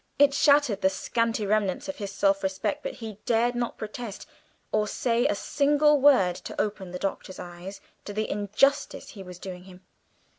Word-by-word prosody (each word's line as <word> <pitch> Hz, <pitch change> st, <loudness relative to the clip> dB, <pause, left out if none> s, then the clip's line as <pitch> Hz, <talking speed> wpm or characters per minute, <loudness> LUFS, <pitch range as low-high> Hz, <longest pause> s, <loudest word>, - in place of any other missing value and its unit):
It 280 Hz, 0 st, +5 dB
shattered 280 Hz, -8 st, +4 dB
the 190 Hz, -, +4 dB
scanty 225 Hz, +2 st, -1 dB
remnants 205 Hz, -2 st, 0 dB
of 285 Hz, -, -5 dB
his 200 Hz, -3 st, -5 dB
self 195 Hz, 0 st, +2 dB
respect, 190 Hz, +2 st, -2 dB
but -, -, -4 dB
he 220 Hz, -4 st, -8 dB
dared 235 Hz, +1 st, +2 dB
not 240 Hz, -1 st, -3 dB
protest 215 Hz, 0 st, -7 dB, 0.5 s
or 215 Hz, 0 st, +1 dB
say 235 Hz, +2 st, +1 dB
a -, -, 0 dB
single 295 Hz, +5 st, +3 dB
word 220 Hz, -11 st, +5 dB
to -, -, -8 dB
open 200 Hz, -3 st, -2 dB
the 180 Hz, -, -5 dB
Doctor's 190 Hz, 0 st, -4 dB
eyes 175 Hz, +3 st, -9 dB, 0.2 s
to -, -, -5 dB
the 215 Hz, +1 st, -2 dB
injustice 210 Hz, -, +1 dB
he 200 Hz, -, -10 dB
was 180 Hz, -2 st, -9 dB
doing 180 Hz, -1 st, -8 dB
him. 185 Hz, -1 st, -14 dB
210 Hz, 180 wpm, -27 LUFS, 190-245 Hz, 0.5 s, It